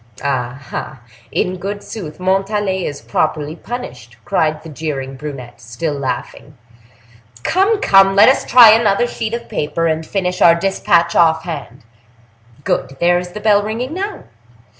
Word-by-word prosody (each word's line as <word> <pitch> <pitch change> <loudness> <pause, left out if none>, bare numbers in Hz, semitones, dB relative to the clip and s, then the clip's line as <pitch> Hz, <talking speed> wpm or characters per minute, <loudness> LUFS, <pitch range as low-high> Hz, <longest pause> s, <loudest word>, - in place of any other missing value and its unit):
"Ah, 130 -2 -2
ah! 135 - -6 0.3
in 185 0 -1
good 200 +3 -5
sooth, 170 -8 -8
Montalais 195 0 0
is 145 -4 -7
properly 150 +5 -1
punished," 125 - -8
cried 155 -1 0
the 165 - -10
jeering 140 -3 -5
brunette, 130 -4 -9
still 120 +7 -4
laughing. 140 +1 -5 0.9
"Come, 395 +4 +2
come! 195 - +5
let 205 +2 +7
us 265 - +3
try 240 -3 +8
another 220 0 +3
sheet 230 -1 -4
of 235 - -7
paper, 165 +3 -2
and 160 0 0
finish 180 +1 -3
our 170 -1 +7
dispatch 170 -1 +1
off 160 -1 +3
hand. 145 -6 -7 0.8
Good! 135 0 -2
there 175 +1 +3
is 180 0 -8
the 210 - -6
bell 210 -1 +3
ringing 230 +7 -4
now. 400 +3 -5
170 Hz, 150 wpm, -17 LUFS, 145-205 Hz, 0.9 s, try